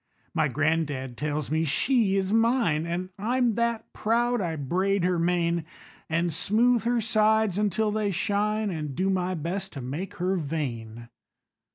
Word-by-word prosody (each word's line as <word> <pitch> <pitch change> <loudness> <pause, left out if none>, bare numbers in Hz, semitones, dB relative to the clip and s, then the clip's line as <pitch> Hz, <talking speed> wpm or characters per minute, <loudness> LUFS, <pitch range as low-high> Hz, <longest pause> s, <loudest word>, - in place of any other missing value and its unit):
My - - +2
gran'dad 145 -3 -1
tells 150 +2 -3
me 160 +1 +2
she 205 - +2
is 195 +1 0
mine, 225 -9 +2
An' 180 +2 -3
I'm 240 +2 +1
that 235 0 -1
proud! 240 +1 +1
I 165 -3 -2
braid 185 +7 0
her 180 -1 +1
mane, 170 -1 +1 0.5
An' 165 +2 +1
smooth 230 +8 +2
her 240 0 +2
sides 215 -2 +2
until 210 +1 +1
they 210 -1 0
shine, 210 +2 0
An' 150 -5 -4
do 190 +3 +1
my 185 -1 0
best 180 +4 -3
to 140 - -6
make 145 +10 -5
her 185 +2 0
vain. 120 -8 -4
185 Hz, 155 wpm, -26 LUFS, 160-215 Hz, 0.5 s, My